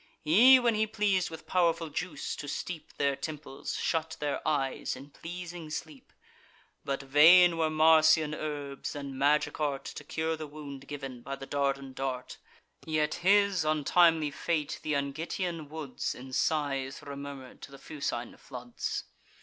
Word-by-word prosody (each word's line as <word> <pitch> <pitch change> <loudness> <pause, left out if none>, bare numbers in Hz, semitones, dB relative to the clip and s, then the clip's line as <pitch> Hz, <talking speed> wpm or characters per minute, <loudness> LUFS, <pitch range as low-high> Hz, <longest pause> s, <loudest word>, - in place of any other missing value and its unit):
He, 225 +13 +8
when 240 -2 +2
he 215 0 +1
pleas'd 205 -4 +1
with 160 - -10
powerful 170 -2 +1
juice 160 0 -4
to 145 - -6
steep 160 +2 -5
Their 140 -1 +1
temples, 150 -2 -6
shut 160 -1 -1
their 145 -1 -2
eyes 140 -4 -1
in 135 +3 -12
pleasing 175 0 -8
sleep. 155 -2 -7 0.7
But 140 0 -3
vain 165 +6 +7
were 160 -1 +1
Marsian 155 0 +5
herbs, 145 -3 -5
and 140 -2 -6
magic 145 +4 +2
art, 145 -3 -1
To - - -7
cure 160 +2 -2
the 155 -1 -7
wound 140 -2 -9
giv'n 135 -4 -7
by 135 +3 -5
the 135 0 -9
Dardan 140 -1 -1
dart: 130 -1 -4 0.4
Yet 155 -1 0
his 200 -1 +4
untimely 155 0 +3
fate 155 0 -2
th' - - -10
Angitian 155 +3 -2
woods 150 -4 -4
In 130 +1 -10
sighs 135 -3 0
remurmur'd 140 -2 -8
to - - -9
the 140 - -11
Fucine 130 -5 -4
floods. 125 -2 -5
150 Hz, 150 wpm, -30 LUFS, 140-165 Hz, 0.7 s, He